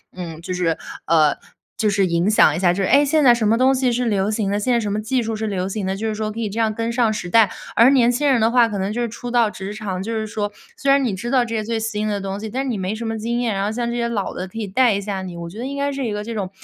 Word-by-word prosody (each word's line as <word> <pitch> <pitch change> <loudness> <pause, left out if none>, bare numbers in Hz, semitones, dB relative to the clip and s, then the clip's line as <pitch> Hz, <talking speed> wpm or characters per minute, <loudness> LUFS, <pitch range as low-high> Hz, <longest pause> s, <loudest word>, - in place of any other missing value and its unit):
嗯， 165 -3 -7
就 170 - -6
是， 175 -3 0 0.3
呃， 155 -2 +3 0.4
就 215 - +1
是 195 -1 +2
影 170 +1 +1
响 180 -8 +5
一 - - -2
下， 175 -2 +3
就 195 - -2
是， 190 - 0
诶， 285 +2 +5
现 300 +2 +2
在 245 -3 +7
什 225 -3 0
么 220 - +4
东 260 +2 +4
西 255 -1 +1
是 245 +1 0
流 205 -2 +1
行 210 -2 -1
的， 205 +1 0
现 245 +4 +1
在 235 - +3
什 210 -3 -2
么 210 - -1
技 245 +4 0
术 225 -1 -3
是 220 +1 -3
流 190 -3 -2
行 200 0 -3
的， 190 0 -1
就 220 +3 -3
是 215 - -2
说 215 0 -3
可 225 - -7
以 220 -2 -2
这 215 +3 -4
样 220 -1 +1
跟 230 +2 -2
上 235 -2 +2
时 180 -4 -5
代。 215 0 +5 0.2
而 235 +3 +6
年 245 -3 +4
轻 280 +4 0
人 260 -5 +3
的 220 - +4
话 240 -1 +4
可 205 -3 -4
能 190 +2 -1
就 230 - -3
是 240 - 0
初 235 +2 -7
到 235 -3 +2
职 190 0 -6
场， 195 -4 -4
就 215 +4 -4
是 220 -1 -2
说 205 -1 -3 0.2
虽 275 - +1
然 275 0 +4
你 235 -6 0
知 235 +6 -5
道 250 -1 +3
这 230 - -6
些 215 - -1
最 225 +1 -2
新 215 -1 -2
的 205 -1 -1
东 195 0 -4
西， 220 +1 -5
但 260 +5 -2
是 270 - -3
你 225 -5 -2
没 190 +3 -2
什 230 +1 -5
么 225 0 -2
经 235 +2 -2
验， 235 -3 0
然 195 0 -1
后 205 - -1
像 235 +1 -2
这 - - -3
些 235 -1 0
老 215 -4 -2
的 185 - -5
可 185 - -12
以 220 - -2
带 220 +3 +3
一 - - -1
下 200 -1 -4
你， 180 -2 -7
我 170 - -6
觉 205 +6 -10
得 245 - -4
应 280 +1 -5
该 280 0 0
是 275 -1 -3
一 - - -2
个 210 0 -3
这 230 +2 -5
种 200 -4 -3
215 Hz, 375 characters per minute, -21 LUFS, 195-235 Hz, 0.4 s, 在